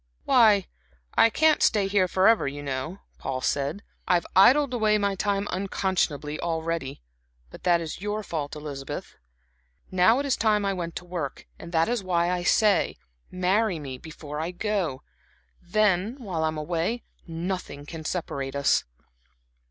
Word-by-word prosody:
"Why, 215 -7 +5 0.5
I 230 - +6
can't 310 +5 +3
stay 210 -3 +3
here 195 -2 +2
forever, 190 +1 +4
you 145 +1 -5
know," 140 +7 -4 0.2
Paul 130 -1 -3
said. 145 +10 -1 0.2
"I've 175 -2 +2
idled 260 +8 +6
away 215 -3 +3
my 200 -1 0
time 200 +1 -1
unconscionably 185 -6 -1
already 165 - -3 0.5
but - - -12
that 175 -1 +4
is 165 +1 -6
your 210 +1 -2
fault, 155 -6 -4
Elizabeth. 145 -3 -6 0.8
Now 185 +6 +5
it 280 - -1
is 275 - +2
time 210 -2 +2
I 195 - +1
went 170 -3 -5
to 180 - -6
work. 170 -6 -5
And 170 - -9
that 165 0 +3
is 235 -3 -1
why 175 -1 +1
I 180 -1 -1
say 205 +2 +3 0.3
marry 185 +2 +1
me 135 -4 -7
before 150 -1 -8
I 160 +2 -2
go. 180 -7 -2 0.6
Then, 205 +3 +1
while 185 - -3
I - - +2
am 155 0 -3
away, 170 +9 -2 0.2
nothing 165 -3 -4
can 160 +1 -8
separate 140 -5 -3
us." 140 0 +3
180 Hz, 155 wpm, -26 LUFS, 155-205 Hz, 0.8 s, I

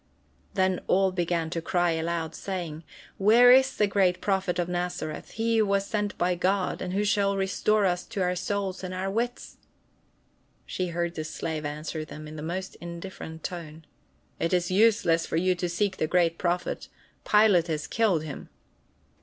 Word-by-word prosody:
Then 185 -1 +2
all 190 0 +3
began 170 -2 -1
to 165 - -2
cry 175 0 +1
aloud, 165 0 -2
saying: 170 -4 -5 0.4
"Where 230 +5 +7
is 265 +1 +5
the 210 - +4
great 195 -3 +2
Prophet 190 -3 0
of 175 -1 0
Nazareth, 175 -3 -3
he 225 +1 +1
who 215 - +3
was 200 0 +1
sent 205 -1 -2
of 175 0 +1
God, 190 +1 0
and 180 0 -3
who 200 +2 +1
shall 200 -1 +2
restore 200 +2 +1
to 190 - +4
us 180 +3 -6
our 180 -1 +1
souls 190 0 -3
and 185 0 -4
our 190 +1 -2
wits?" 240 +4 -3 1.1
She 185 - -3
heard 170 0 -2
the 155 - -4
slave 155 0 -4
answer 155 +2 -4
them 155 0 -9
in 155 - -9
the 150 - -6
most 180 +4 -4
indifferent 170 -1 -8
tone: 160 -4 -7 0.5
"It 165 - 0
is 180 0 +1
useless 195 -5 +3
for - - -1
you 185 +2 +3
to 180 0 -3
seek 190 +2 -1
the 155 - 0
great 170 -1 +2
Prophet, 175 0 -1 0.4
Pilate 210 -5 +4
has 155 -2 -2
killed 205 -8 +1
him." 150 -3 -8
180 Hz, 175 wpm, -27 LUFS, 165-200 Hz, 1.1 s, Where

